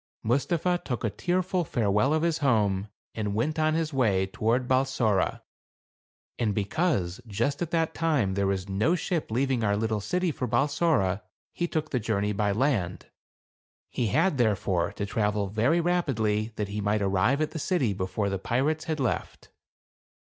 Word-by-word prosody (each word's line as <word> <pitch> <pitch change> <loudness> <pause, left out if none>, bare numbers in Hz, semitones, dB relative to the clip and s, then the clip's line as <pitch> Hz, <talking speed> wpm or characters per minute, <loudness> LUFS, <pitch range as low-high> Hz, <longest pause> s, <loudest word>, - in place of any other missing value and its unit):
Mustapha 170 +9 +1
took 125 -4 -3
a 110 - 0
tearful 180 - 0
farewell 110 -2 +1
of 155 +1 +1
his 170 -2 +1
home, 105 -8 +2 0.3
and 105 -2 -2
went 150 +8 0
on 155 0 +2
his 160 -2 -1
way 105 -8 +2
toward 115 +6 0
Balsora. 130 -7 +1 1.0
And 105 -4 0
be 105 - 0
cause, 100 - 0
just 115 - -1
at 170 - -1
that 165 -1 0
time, 145 -12 +1
there 100 0 0
was 95 -1 -1
no 105 - +1
ship 175 -2 -2
leaving 125 +1 0
our 100 -1 +2
little 110 -1 -1
city 180 - 0
for 130 -3 -3
Balsora, 125 - +1 0.3
he 175 - -1
took 155 -2 -3
the 125 - +1
journey 105 -2 0
by 105 0 +1
land. 105 -6 -1 0.8
He 120 - -1
had, 155 - +2
therefore, 100 -5 +1
to 100 - -3
travel 105 0 0
very 120 - +2
rapidly 115 -12 0
that 105 -2 -3
he 105 +1 -3
might 105 0 +1
arrive 100 +8 +2
at 155 -1 0
the 160 - -5
city 145 - +1
before 95 +2 -2
the 95 - -2
pirates 150 +9 0
had 160 -2 -2
left. 130 -4 -3
115 Hz, 170 wpm, -27 LUFS, 100-155 Hz, 1.0 s, home